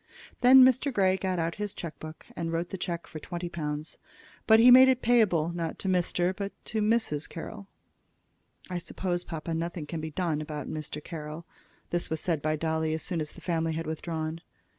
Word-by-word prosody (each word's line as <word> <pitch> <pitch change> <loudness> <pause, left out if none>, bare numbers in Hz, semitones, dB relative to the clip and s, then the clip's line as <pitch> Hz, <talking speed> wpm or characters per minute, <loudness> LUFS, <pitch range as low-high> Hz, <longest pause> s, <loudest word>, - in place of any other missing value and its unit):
Then 255 +1 +9
Mr. 260 +2 +3
Grey 190 -5 +3
got 190 -1 -2
out 165 0 0
his 205 -1 -3
check 165 -2 -7
book 155 0 -9
and 165 -1 -3
wrote 170 +1 -2
the 190 - -5
check 170 -2 -3
for 155 - -8
twenty 175 +3 -5
pounds. 150 -2 -5 0.5
But 220 0 +7
he 245 +2 +8
made 260 +1 +9
it 255 -1 +1
payable, 210 -10 +3
not 165 -2 -3
to - - -5
Mr. 180 0 +1
but 200 0 -4
to 220 - -2
Mrs. 210 -9 +1
Carroll. 190 +4 -8 1.0
"I 180 -1 -3
suppose, 175 0 -3
papa, 165 0 -5
nothing 165 -1 -3
can 160 +1 -5
be 160 - -4
done 155 -2 -1
about 150 -1 -5
Mr. 150 -1 -5
Carroll." 155 0 -7 0.5
This 175 0 0
was 160 - -1
said 165 -3 -1
by 155 +1 0
Dolly 160 0 -1
as 160 - -5
soon 170 -4 -2
as 150 - -5
the - - -13
family 165 -2 -1
had 165 +1 -3
withdrawn. 160 0 -4
170 Hz, 200 wpm, -28 LUFS, 160-190 Hz, 1.0 s, Then